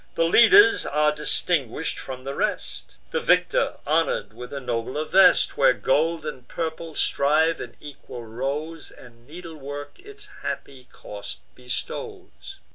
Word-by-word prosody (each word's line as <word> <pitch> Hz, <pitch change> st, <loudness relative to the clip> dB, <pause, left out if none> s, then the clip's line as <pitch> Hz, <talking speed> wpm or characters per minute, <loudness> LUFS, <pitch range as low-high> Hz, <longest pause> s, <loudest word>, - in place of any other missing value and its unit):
The 165 Hz, -, +2 dB
leaders 400 Hz, -, +7 dB
are 150 Hz, +1 st, +2 dB
distinguish'd 150 Hz, -2 st, -1 dB
from 130 Hz, -1 st, -8 dB
the 135 Hz, +1 st, -5 dB
rest; -, -, -3 dB, 0.2 s
The -, -, 0 dB
victor -, -, +2 dB
honour'd 155 Hz, -7 st, 0 dB
with 125 Hz, +2 st, -10 dB
a 140 Hz, -, -4 dB
nobler 125 Hz, +4 st, -3 dB
vest, 190 Hz, +3 st, +5 dB
Where 135 Hz, -2 st, +5 dB
gold 160 Hz, +5 st, 0 dB
and 130 Hz, -5 st, -7 dB
purple 160 Hz, -1 st, -5 dB
strive 155 Hz, +4 st, +2 dB
in 120 Hz, -, -8 dB
equal 130 Hz, -4 st, -10 dB
rows, 140 Hz, +8 st, -4 dB
And 120 Hz, -1 st, -17 dB
needlework 150 Hz, -, -9 dB
its 415 Hz, +2 st, -11 dB
happy 130 Hz, -2 st, -6 dB
cost 100 Hz, -1 st, -9 dB
bestows. 385 Hz, -, -7 dB
150 Hz, 130 wpm, -24 LUFS, 130-165 Hz, 0.2 s, leaders